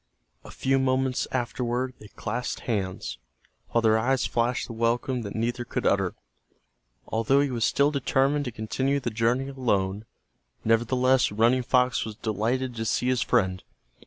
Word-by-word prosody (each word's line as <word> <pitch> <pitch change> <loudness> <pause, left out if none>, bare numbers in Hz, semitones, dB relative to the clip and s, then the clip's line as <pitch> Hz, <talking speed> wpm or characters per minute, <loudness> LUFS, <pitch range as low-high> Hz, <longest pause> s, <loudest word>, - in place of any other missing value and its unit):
A - - -12
few 135 0 +1
moments 130 -1 +1
afterward 125 0 -1
they 105 - -12
clasped 120 +4 -4
hands, 95 - -3 0.5
while 115 - +1
their 110 0 +4
eyes 130 +2 +1
flashed 120 +1 0
the 115 - -8
welcome 120 +2 0
that 100 -3 -6
neither 120 +2 -1
could 120 - -4
utter. - - +2 0.9
Although 115 +5 +2
he 145 -2 0
was 115 -2 0
still 140 +1 +3
determined 140 +1 +1
to 125 - -3
continue 130 +6 -1
the 120 -3 -3
journey 120 +5 +1
alone, 105 -6 -1 0.6
nevertheless 125 +3 +3
Running 115 +5 +3
Fox 125 0 +2
was 110 -1 -6
delighted 115 +5 -1
to 115 - -2
see 125 +3 +1
his 130 -1 +1
friend. 95 -6 +1
120 Hz, 155 wpm, -26 LUFS, 110-130 Hz, 0.9 s, their